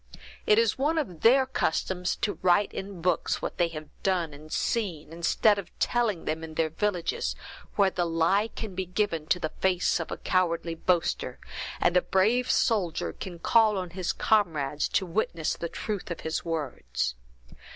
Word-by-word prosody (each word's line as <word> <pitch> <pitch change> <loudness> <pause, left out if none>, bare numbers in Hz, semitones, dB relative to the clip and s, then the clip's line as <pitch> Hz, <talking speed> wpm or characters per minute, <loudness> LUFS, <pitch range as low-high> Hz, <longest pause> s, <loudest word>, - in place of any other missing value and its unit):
It 210 - +6
is 230 +2 +2
one 305 +4 +1
of 185 - -3
their 260 +3 +6
customs 180 -6 -1
to 205 - -1
write 185 +3 +3
in 190 -3 -6
books 180 -3 +1
what - - -5
they 175 - +4
have 155 -2 -8
done 175 -5 0
and 155 +2 -12
seen, 175 -9 -2
instead 200 +5 +3
of 190 - -7
telling 230 -8 0
them 160 +1 -2
in 160 -1 -8
their 160 -1 +1
villages, 170 - -1 0.4
where 195 -2 +4
the 175 -1 0
lie 165 +6 +2
can 220 -3 -7
be 185 0 -3
given 180 -5 -1
to 180 - +2
the 155 -3 -3
face 185 -2 +2
of 165 - -4
a - - -4
cowardly 170 -2 0
boaster, 170 0 0 0.4
and 175 - +2
the 180 - +6
brave 225 +9 +2
soldier 200 -9 +1
can 180 -3 -7
call 215 +4 +4
on 180 -2 -4
his 180 0 -2
comrades 155 -9 +1
to 190 - 0
witness 170 -3 -1
for - - -10
the 170 - -3
truth 205 0 -4
of 170 - -5
his 160 0 -2
words. 130 - -2
180 Hz, 180 wpm, -28 LUFS, 165-205 Hz, 0.4 s, It